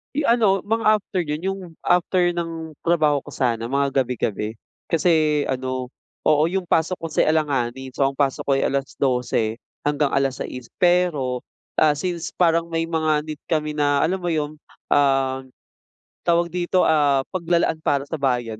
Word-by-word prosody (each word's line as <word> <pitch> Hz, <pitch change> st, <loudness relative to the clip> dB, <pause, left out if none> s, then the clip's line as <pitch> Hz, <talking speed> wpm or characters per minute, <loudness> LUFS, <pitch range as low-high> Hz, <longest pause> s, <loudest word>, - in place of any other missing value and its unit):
Eh, 290 Hz, 0 st, 0 dB
ano 220 Hz, -5 st, +4 dB
mga 215 Hz, +1 st, +2 dB
after 185 Hz, -2 st, -3 dB
yun, 150 Hz, -1 st, -3 dB
yung 195 Hz, +3 st, -3 dB, 0.2 s
after 175 Hz, 0 st, +2 dB
ng 165 Hz, -2 st, -5 dB
trabaho 155 Hz, -4 st, +2 dB
ko -, -, -11 dB
sana 120 Hz, -2 st, -1 dB
mga 140 Hz, -1 st, +2 dB
gabi-gabi. 110 Hz, -3 st, -3 dB, 0.3 s
Kasi 155 Hz, -3 st, +3 dB
ano, 130 Hz, -1 st, -2 dB, 0.4 s
oo, 150 Hz, -1 st, +4 dB
yung 190 Hz, -1 st, -2 dB
pasok 165 Hz, +3 st, +1 dB
ko 165 Hz, -, -4 dB
si 155 Hz, -, +1 dB
alanganin. 135 Hz, -4 st, -1 dB
So, 140 Hz, -, +1 dB
ang 135 Hz, -, -20 dB
pasok 140 Hz, -2 st, +1 dB
ko'y 135 Hz, -, +3 dB
12 125 Hz, -4 st, -1 dB, 0.3 s
hanggang 145 Hz, -1 st, +1 dB
6:00. 130 Hz, -2 st, -2 dB
Pero, 175 Hz, -8 st, +2 dB, 0.4 s
ah, 150 Hz, -1 st, +4 dB
since 170 Hz, +2 st, -4 dB
parang 170 Hz, -1 st, +2 dB
may 165 Hz, -1 st, -1 dB
mga 160 Hz, -2 st, 0 dB
need 155 Hz, -1 st, -7 dB
kami 155 Hz, -1 st, 0 dB
na 145 Hz, -1 st, +2 dB
alam 185 Hz, +4 st, 0 dB
mo 175 Hz, -, -4 dB
yum, 155 Hz, -2 st, -2 dB, 0.3 s
um, 135 Hz, -2 st, +3 dB, 0.8 s
tawag 170 Hz, 0 st, +2 dB
dito, 180 Hz, +2 st, +1 dB
ah, 145 Hz, -4 st, +3 dB
paglalaan 170 Hz, -3 st, 0 dB
para 140 Hz, 0 st, 0 dB
na 160 Hz, -, -3 dB
bayan 120 Hz, -6 st, -1 dB
150 Hz, 155 wpm, -22 LUFS, 135-170 Hz, 0.8 s, ano